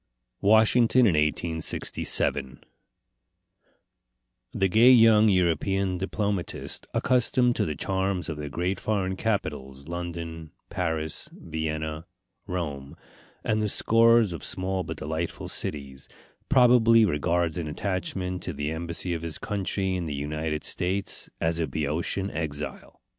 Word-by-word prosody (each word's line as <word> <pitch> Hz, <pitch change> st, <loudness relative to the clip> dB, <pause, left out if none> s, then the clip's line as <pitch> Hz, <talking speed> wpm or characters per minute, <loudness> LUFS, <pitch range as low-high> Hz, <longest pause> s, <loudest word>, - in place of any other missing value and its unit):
WASHINGTON 110 Hz, +4 st, +5 dB
IN 110 Hz, -8 st, +5 dB
1867 75 Hz, -3 st, -1 dB, 1.9 s
The 95 Hz, -, +1 dB
gay 110 Hz, +7 st, +6 dB
young 115 Hz, -3 st, +7 dB
European 90 Hz, +1 st, +1 dB
diplomatist, 100 Hz, -1 st, -3 dB
accustomed 125 Hz, -1 st, +2 dB
to -, -, +1 dB
the 75 Hz, -, -3 dB
charms 95 Hz, +2 st, -1 dB
of 80 Hz, -, -4 dB
the 75 Hz, -1 st, -5 dB
great 90 Hz, +6 st, -2 dB
foreign 95 Hz, -3 st, -1 dB
capitals 75 Hz, -11 st, -3 dB
London, 85 Hz, -2 st, -6 dB, 0.2 s
Paris, 80 Hz, -3 st, -3 dB
Vienna, 80 Hz, 0 st, -4 dB, 0.4 s
Rome, 75 Hz, -6 st, -4 dB, 0.5 s
and 110 Hz, 0 st, 0 dB
the 105 Hz, -, 0 dB
scores 115 Hz, -2 st, +4 dB
of 85 Hz, -, -7 dB
small 95 Hz, 0 st, -1 dB
but -, -, -6 dB
delightful 80 Hz, +3 st, -4 dB
cities 70 Hz, -2 st, -4 dB, 0.4 s
probably 120 Hz, -3 st, +6 dB
regards 85 Hz, 0 st, 0 dB
an 80 Hz, -, -4 dB
attachment 90 Hz, +2 st, -3 dB
to 90 Hz, -, -4 dB
the 75 Hz, +1 st, -3 dB
embassy 85 Hz, +2 st, -3 dB
of 85 Hz, -, -3 dB
his 85 Hz, -2 st, -4 dB
country 95 Hz, -2 st, -2 dB
in 90 Hz, -3 st, -2 dB
the 75 Hz, -, -3 dB
United 75 Hz, +2 st, -3 dB
States 95 Hz, +2 st, -1 dB
as 80 Hz, 0 st, 0 dB
a 80 Hz, -, 0 dB
Boeotian 80 Hz, +6 st, -2 dB
exile. 75 Hz, -2 st, -6 dB
90 Hz, 120 wpm, -26 LUFS, 80-100 Hz, 1.9 s, young